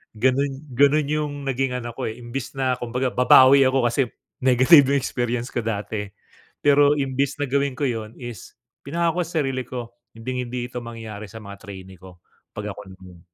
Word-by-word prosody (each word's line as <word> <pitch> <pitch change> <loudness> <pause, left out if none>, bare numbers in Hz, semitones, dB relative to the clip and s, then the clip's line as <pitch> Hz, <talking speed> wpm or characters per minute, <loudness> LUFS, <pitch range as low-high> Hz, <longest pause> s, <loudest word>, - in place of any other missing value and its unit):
Ganun 130 +4 +2 0.2
ganun 145 +3 +4
yung 150 -1 -1
naging 135 0 0
ano 120 -1 -5
ko - - -4
eh, 110 - -8
imbes 120 +3 -6
na 130 -1 +1
kumbaga 125 +2 -1
babawi 130 +2 +7
ako, 130 -1 +2
kasi 120 0 0 0.3
negative 130 +3 +6
yung - - +4
experience 120 -1 -2
ko 120 - 0
dati. 105 -1 -3 0.6
Pero 145 0 +5
imbes 135 0 -1
na 145 - 0
gawin 140 0 +1
ko - - -3
yun 110 -2 -4
is 120 -6 -9 0.3
pinangako 170 +4 0
sa 165 -1 -4
sarili 135 -1 -2
ko, 120 -2 -6 0.2
hinding-hindi 125 0 -4
ito 125 - -4
mangyayari 110 -3 -8
sa 110 - -10
mga 100 0 -10
trainee 95 -3 -10
ko 90 -1 -13 0.4
'pag 105 0 -4
ako 105 - -9
naman. 90 -2 -15
125 Hz, 175 wpm, -23 LUFS, 115-135 Hz, 0.6 s, babawi